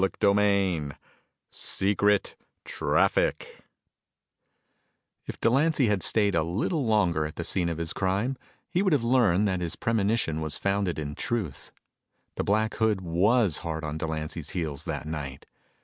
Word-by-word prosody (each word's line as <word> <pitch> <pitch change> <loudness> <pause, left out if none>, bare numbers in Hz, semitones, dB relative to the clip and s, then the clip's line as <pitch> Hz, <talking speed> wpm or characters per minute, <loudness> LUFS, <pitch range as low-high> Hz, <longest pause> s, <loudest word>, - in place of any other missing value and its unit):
CHAPTER 95 +1 +2
II 95 -7 +1 0.6
Secret 100 +1 +1 0.3
Traffic - - 0 1.7
If - - -7
Delancy 135 +1 +3
had 105 -3 +1
stayed 105 0 +2
a 85 - +2
little 105 - -1
longer 95 -8 +2
at 75 - -11
the 85 - -4
scene 85 0 0
of 85 - -3
his 85 -1 -3
crime, 100 +8 0 0.4
he 175 +1 +1
would 190 -4 +2
have 140 -5 +2
learned 110 -6 +3
that 95 -2 -1
his 85 -2 -2
premonition 105 -7 0
was 80 -1 -2
founded 100 -2 0
in 75 -1 -4
truth. 95 - -4 0.6
The - - -3
Black 110 +2 +1
Hood 110 -3 +1
was 95 +2 +2
hard 80 -1 -4
on 75 0 -4
Delancy's 80 -1 -4
heels 80 -6 -4
that - - -4
night. 75 -4 -6
95 Hz, 145 wpm, -27 LUFS, 80-110 Hz, 1.7 s, Delancy